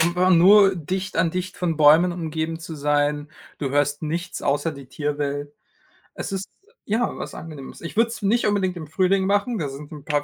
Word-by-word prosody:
einfach 180 +2 +3
nur 195 +3 +7
dicht 185 +3 -4
an 165 0 +2
dicht 185 +1 -4
von 170 -3 -1
Bäumen 155 +4 +6
umgeben 160 -1 -3
zu 165 0 -8
sein. 145 0 0 0.3
Du 140 -3 -2
hörst 145 +1 +1
nichts 170 +4 -3
außer 145 +3 0
die 140 -2 -11
Tierwelt. 145 +1 -3 0.6
Es - - -6
ist 195 0 -4 0.4
ja, 225 +3 +1
was - - -6
Angenehmes. 150 -4 -9
Ich 170 - -7
würde 230 +2 +3
es 230 - -7
nicht 215 +4 +2
unbedingt 195 -3 0
im 160 -3 -7
Frühling 190 +4 +2
machen, 205 +4 +1
da 150 -7 -2
sind 145 +2 -10
'n 150 -2 -10
paar 145 -1 0
165 Hz, 195 wpm, -23 LUFS, 145-185 Hz, 0.6 s, nur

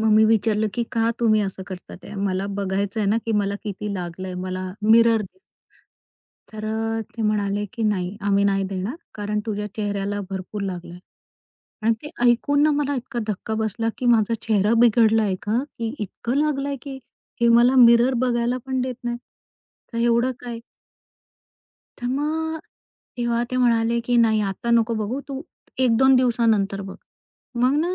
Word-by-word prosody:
मग 220 0 +2
मी 215 +1 +6
विचारलं, 220 -1 +2
की 240 - 0
का 230 0 +2
तुम्ही 215 -2 +4
असं 190 -1 -3
करतात 185 -2 -9
ते - - -10
मला 195 -1 -1
बघायचंय 200 +2 -1
ना, 210 - +3
की 225 - 0
मला 200 -1 +1
किती 210 0 -4
लागलंय, 180 0 -5
मला 185 0 -4 0.2
मिरर 230 -1 +6
दे. 210 - -13 1.1
तर 215 0 -6
अ, 225 +1 -1 0.2
ते 230 - -2
म्हणाले, 205 -1 0
की, 235 -3 -4
"नाही 200 -3 -1
आम्ही 200 0 +3
नाही 195 -1 +2
देणार 195 - -4 0.2
कारण 210 0 -2
तुझ्या 210 -1 -2
चेहऱ्याला 205 -1 -2
भरपूर 195 +2 -5
लागलंय" 180 -2 -6 0.9
आणि 230 +1 +4
ते 295 - -8
ऐकून 245 +4 +3
ना 305 - +4
मला 285 -1 0
इतका 245 -1 -4
धक्का 215 +1 -3
बसला, 225 +1 -1
की 255 - -4
माझा 230 -2 +4
चेहरा 210 0 +3
बिघडलाय 220 -3 +4
का, 225 +5 0
की 230 +1 -3
इतकं 220 +4 -4
लागलंय, 285 -2 0
की 275 -2 -7 0.4
हे 235 - +5
मला 240 +3 +5
मिरर 235 +2 +5
बघायला 240 0 0
पण 260 -1 -1
देत 255 -1 -3
नाही 240 0 -2 0.8
का 230 - -2
एवढं 235 +2 +2
काय? 235 -2 -6 1.4
तर - - -3
मग 315 +4 -1 0.6
तेव्हा 235 0 0
ते - - -1
म्हणाले, 235 -1 +2
की, 240 +1 -1
"नाही 225 -2 +4
आता 200 +3 -3
नको 230 0 +3
बघू 230 +6 -2
तू 275 -1 -5 0.4
1-2 260 +1 +5
दिवसानंतर 225 -5 +2
बघ." 195 -1 -8 0.7
मग 260 +3 +4
ना 335 - 0
225 Hz, 165 wpm, -23 LUFS, 205-240 Hz, 1.4 s, मी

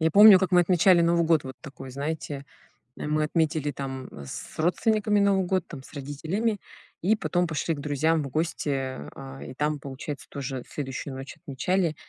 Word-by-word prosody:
Я 160 0 +3
помню, 205 +1 +10
как 185 -1 0
мы 180 - +7
отмечали 175 +1 +5
Новый 170 0 +3
год. 160 -3 +3
Вот 130 0 -6
такой, 135 -3 -9
знаете, 140 +1 -4 0.5
э, - - -5
мы 155 0 +1
отметили 155 -2 0
там, 135 -1 -5
м, 70 - -9
с - - -8
родственниками 210 +4 +2
Новый 195 -2 +3
год, 185 -1 0
там 135 -5 -9
с - - -15
родителями, 160 +10 -2 0.4
и 205 +6 +3
потом 180 -4 0
пошли 160 +1 -1
к - - -8
друзьям 150 +2 +1
в 140 - -5
гости, 155 +1 -1
э, 130 - -3
а, 65 0 -9
и 75 - -8
там, 150 +2 -1
получается, 140 +1 -7
тоже 135 -3 -5
следующую 135 -1 -5
ночь 135 +1 -8
отмечали. 170 +2 0
155 Hz, 190 wpm, -26 LUFS, 135-175 Hz, 0.5 s, помню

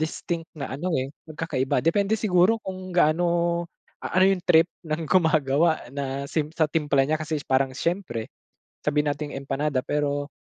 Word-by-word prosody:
distinct 165 +1 -3
na 140 - -5
ano 170 +6 -2
eh 130 +1 -3 0.2
pagkakaiba. 135 -5 -1
Depende 200 +5 +2
siguro 200 0 +3
kung 185 -1 -7
gaano, 170 +1 +2 0.4
a - - -4
ano 185 - +6
'yung 185 - -1
trip 165 +1 +6 0.2
ng 155 +1 -2
gumagawa 160 -4 +2
na 140 0 -4
same 155 -2 0
sa 160 - +3
timpla 145 -4 +2
niya 155 +2 0
kasi 155 0 -2
parang 130 0 +1
siyempre, 165 - -2 0.6
sabihin 150 0 +2
nating 145 +1 -5
empanada 135 0 -1
pero 145 0 -1
155 Hz, 155 wpm, -25 LUFS, 140-170 Hz, 0.6 s, ano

